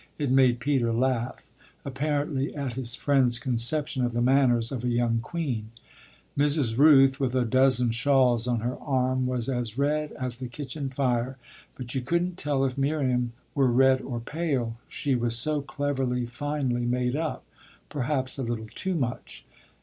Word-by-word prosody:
It 145 -4 -1
made 130 -2 +4
Peter 125 -3 +1
laugh 125 +1 -1 0.3
apparently 145 0 -2
at 140 -4 -3
his 120 -1 -4
friend's 130 -4 +2
conception 130 +3 -1
of 120 -1 -1
the 120 - 0
manners 125 -3 +3
of 125 -3 -4
a 125 - 0
young 120 -1 +1
queen. 120 -5 -3 0.7
Mrs. 145 -5 +2
Rooth, 135 -1 +6
with 130 -2 -1
a 125 -1 +2
dozen 130 0 +3
shawls 125 -1 +2
on 120 -2 0
her 120 +2 -2
arm, 130 -2 0
was 125 -2 -2
as 120 -3 -2
red 150 +2 0
as 125 -2 -4
the 130 - -4
kitchen 135 +2 -5
fire, 130 -1 -1 0.4
but 125 -1 -6
you 135 - -1
couldn't 170 +7 -1
tell 140 -2 +1
if 130 0 -3
Miriam 130 -4 0 0.2
were 135 -2 +3
red 130 +2 +4
or 120 -3 -4
pale: 135 -4 -2
she 140 - -2
was 120 -2 +2
so 150 +5 +2
cleverly, 135 -3 -2
finely 130 -1 -2
made 125 +1 0
up 155 0 -3 0.4
perhaps 135 -1 -2
a - - -1
little 115 -3 -4
too 190 -1 -2
much. 125 -6 -4
130 Hz, 165 wpm, -26 LUFS, 120-140 Hz, 0.7 s, Rooth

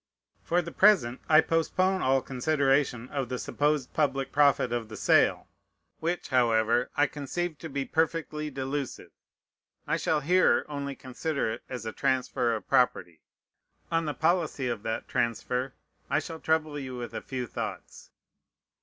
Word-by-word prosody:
For 175 +1 +1
the 170 - -7
present 180 - +4
I 155 0 +8
postpone 185 +4 +1
all 130 0 +2
consideration 135 -2 +1
of 135 -4 -3
the 125 - -2
supposed 145 0 -1
public 135 -3 0
profit 140 -4 +3
of 115 -2 -3
the 110 - -8
sale, - - +3 0.5
which, 170 +2 -2
however, 120 -1 +2
I 145 - +5
conceive 150 +3 -4
to 160 - -7
be 140 -1 -2
perfectly 160 -1 -1
delusive. 135 0 -4 0.7
I - - 0
shall 155 -2 0
here 180 +6 +3
only 140 -2 -4
consider 135 0 -3
it - - -6
as 125 -3 -6
a 110 - -3
transfer 125 -3 0
of 110 - -7
property. 125 -11 +1 0.7
On 165 0 +1
the 150 -2 -3
policy 160 -3 +1
of 120 -4 -2
that 110 +1 -3
transfer 125 +2 -1 0.3
I 140 - +2
shall 160 +2 -4
trouble 155 -2 0
you 130 -2 -6
with 120 -1 -6
a - - -4
few 130 -2 -4
thoughts. - - -7
140 Hz, 155 wpm, -28 LUFS, 125-155 Hz, 0.7 s, I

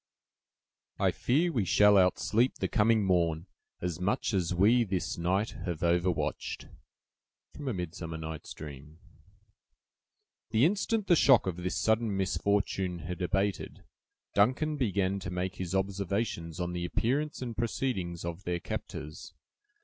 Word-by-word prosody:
"I - - +2
fear 160 +8 +1
we 120 -9 +1
shall 105 +3 +5
outsleep 105 +6 +3
the - - -2
coming 110 0 +3
morn 85 -3 +1 0.4
As 90 -1 -3
much 100 +4 0
as 90 -4 0
we 105 +7 +4
this 95 -4 -2
night 95 +5 0 0.2
have 85 -2 -3
overwatched!" 85 0 0 0.9
—Midsummer 90 - -4
Night's 80 -1 -7
Dream 75 +1 -10 1.5
The 110 +5 +4
instant 210 +4 +1
the 175 - +5
shock 135 -5 +5
of 90 -3 -2
this 90 0 -2
sudden 110 -2 +1
misfortune 95 -1 0
had 90 +1 -5
abated, 95 +1 -1 0.5
Duncan 130 +9 +2
began 100 -7 0
to 90 - -6
make 90 +2 -3
his 95 0 -3
observations 95 -3 -2
on 90 0 -2
the 90 0 -3
appearance 130 - -1
and 120 -2 -5
proceedings 105 -8 -2
of 85 +2 -5
their 90 -1 -2
captors. 75 -1 -7
95 Hz, 130 wpm, -30 LUFS, 85-110 Hz, 1.5 s, shall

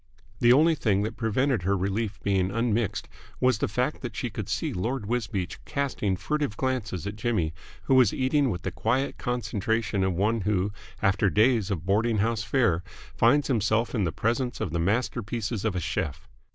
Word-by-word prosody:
The 120 - +5
only 155 +6 +6
thing 105 -9 +1
that 110 - -3
prevented 120 +1 +1
her 100 +3 +1
relief 100 +3 -2
being 95 -2 +1
unmixed 115 0 0 0.3
was 125 -4 +3
the - - +1
fact - - -1
that - - -6
she - - -3
could - - -5
see - - -1
Lord 115 +5 -2
Wisbeach 100 -5 -3
casting 135 -9 -1
furtive 145 - -2
glances 120 - -2
at 100 - -4
Jimmy, 105 -8 0 0.3
who - - +1
was 130 -5 +6
eating 135 +1 +1
with 90 -5 -4
the - - -2
quiet 130 +5 -1
concentration 110 -3 -1
of 95 -1 +1
one 105 +5 +1
who, 100 0 0 0.3
after 100 0 +3
days 110 0 +3
of 90 -5 -3
boarding 110 +4 +2
house 110 +1 +1
fare, 110 -5 +2 0.3
finds 140 +5 +4
himself 115 -2 +1
in 110 -5 +1
the 85 - 0
presence 120 +5 -1
of 85 - -2
the 85 - -1
masterpieces 110 +2 -1
of 110 -4 0
a - - 0
chef. 80 -3 -3
110 Hz, 180 wpm, -27 LUFS, 100-125 Hz, 0.3 s, only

